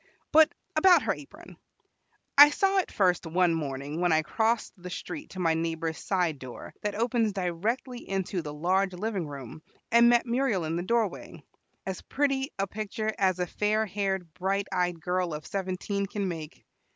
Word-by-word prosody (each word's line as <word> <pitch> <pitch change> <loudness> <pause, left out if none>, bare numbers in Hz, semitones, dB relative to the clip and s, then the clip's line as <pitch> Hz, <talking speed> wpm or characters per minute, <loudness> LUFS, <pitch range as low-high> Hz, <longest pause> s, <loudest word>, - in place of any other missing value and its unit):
But 315 0 +7 0.2
about 355 +3 +6
her - - +1
apron. - - -13 0.8
I 290 +1 +11
saw 390 +5 +2
it 375 - -2
first 180 -3 +2
one 175 +1 +2
morning 145 0 -3
when 175 -1 +3
I 160 0 +3
crossed 225 +7 0
the 180 -1 -9
street 295 - -6
to 190 - -7
my 165 -2 +2
neighbor's 165 0 -2
side 175 -7 0
door 130 -2 -9
that 210 -1 -2
opens 230 -1 +1
directly 210 +8 -3
into 190 -1 -1
the 150 -2 -6
large 185 +5 +1
living 195 -2 -3
room, 140 +1 -8 0.3
and 235 +1 +7
met 240 0 +4
Muriel 235 -7 0
in 160 +1 -2
the 170 - -1
doorway, 220 0 -2 0.4
as 190 -1 -4
pretty 275 -1 0
a 195 - +1
picture 215 +2 -3
as 190 -2 +2
a 180 - 0
fair 210 +4 0
haired, 190 -4 -2
bright 195 +2 -1
eyed 180 -2 0
girl 180 -1 -1
of 150 - -8
seventeen 195 +1 -2
can 200 0 -3
make. 165 -2 -7
190 Hz, 175 wpm, -28 LUFS, 170-220 Hz, 0.8 s, I